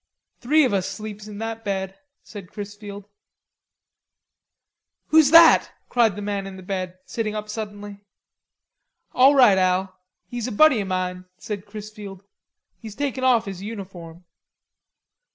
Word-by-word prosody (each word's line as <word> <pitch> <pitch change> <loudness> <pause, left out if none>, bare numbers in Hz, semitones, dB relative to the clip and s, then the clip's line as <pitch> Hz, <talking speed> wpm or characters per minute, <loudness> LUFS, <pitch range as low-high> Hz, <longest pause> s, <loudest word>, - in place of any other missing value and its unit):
"Three 300 +4 +3
of 245 - -1
us 190 -2 0
sleeps 215 -1 -8
in 210 -1 -9
that 225 +1 -5
bed," 190 -1 -3 0.3
said 200 -4 -11
Chrisfield. 205 -1 -9 2.0
"Who's 315 -3 +6
that?" 330 +1 +7 0.2
cried 235 -4 +2
the 205 - -6
man 200 -1 -3
in 190 -1 -9
the 185 - -11
bed, 185 -1 -4
sitting 215 -2 -3
up 210 0 -5
suddenly. 205 -1 -7 1.1
"All 270 +3 +6
right, 230 -8 +6
Al, 185 0 0 0.3
he's 240 -1 -5
a - - -4
buddy 260 0 +5
o' - - -4
mine," 185 -1 -3
said 205 -3 -7
Chrisfield. 205 -2 -10 0.6
"He's 220 -3 -10
taken 270 0 -3
off 245 -3 +3
his 195 -2 -7
uniform." 185 -5 -9
205 Hz, 135 wpm, -23 LUFS, 195-225 Hz, 2.0 s, that